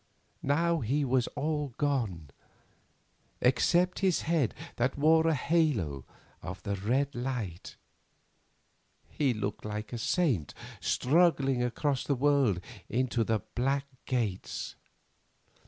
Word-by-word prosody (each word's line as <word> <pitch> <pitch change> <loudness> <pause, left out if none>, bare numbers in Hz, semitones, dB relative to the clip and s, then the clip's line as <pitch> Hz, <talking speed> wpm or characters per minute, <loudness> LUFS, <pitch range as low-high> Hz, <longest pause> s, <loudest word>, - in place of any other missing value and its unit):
Now 165 +4 +2
he 140 +4 0
was 125 -1 +2
all 150 -4 -2
gone, 110 - -1 1.1
except 175 +8 +3
his 190 -4 +2
head 160 -8 +1 0.2
that 125 +3 0
wore 160 +2 +4
a 160 - +3
halo 125 - +1 0.4
of 95 +1 -7
the 100 - -2
red 130 +9 0
light. 120 -9 -4 1.3
He 140 -4 +1
looked 105 -3 -3
like 105 0 -5
a 120 - -3
saint 125 - 0 0.2
struggling 135 -3 +2
across 130 +3 0
the 140 - 0
world 135 -8 +2 0.3
into 120 -1 +1
the 110 -2 0
Black 135 +3 0 0.2
Gates. 115 -8 -2
130 Hz, 110 wpm, -30 LUFS, 110-150 Hz, 1.3 s, wore